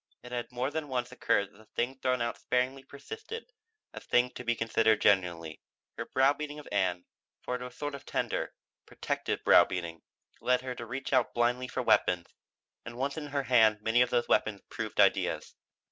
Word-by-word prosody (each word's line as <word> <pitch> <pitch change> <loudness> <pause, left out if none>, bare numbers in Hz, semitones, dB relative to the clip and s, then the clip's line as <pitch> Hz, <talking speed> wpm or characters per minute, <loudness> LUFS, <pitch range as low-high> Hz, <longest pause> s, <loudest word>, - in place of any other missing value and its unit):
It 125 - -10
had 120 0 -4
more 125 +3 -2
than 155 0 -3
once 125 -2 -2
occurred 100 -5 +1
that - - -20
the 110 - -17
thing 130 +4 -3
thrown 125 -2 +1
out 120 - -3
sparingly 130 +2 0
persisted 445 - -9 0.4
as - - -8
thing 125 +1 +2
to 125 - -8
be 120 -1 +1
considered 110 -1 +2
genuinely. 90 -5 +1 0.3
Her - - -5
browbeating 145 +3 +1
of 150 - -10
Ann 90 -3 0 0.4
for - - -3
it 125 - -3
was 125 0 -7
a - - -21
sort 145 +1 -3
of 140 - -7
tender, - - -2 0.3
protective - - -3
browbeating 85 -3 +4 0.4
led 125 0 +2
her 130 -1 -4
to 120 -2 -8
reach 130 +4 -4
out - - +2
blindly 120 +2 +1
for - - -3
weapons, 90 -1 +3 0.6
and 120 0 -8
once 140 +2 -1
in 155 -2 -5
her 140 -1 -1
hand 110 -4 +4
many 115 +2 +3
of 125 - +3
those 120 -1 +1
weapons 105 -2 +1
proved - - -5
ideas. - - +2
125 Hz, 190 wpm, -30 LUFS, 110-135 Hz, 0.6 s, browbeating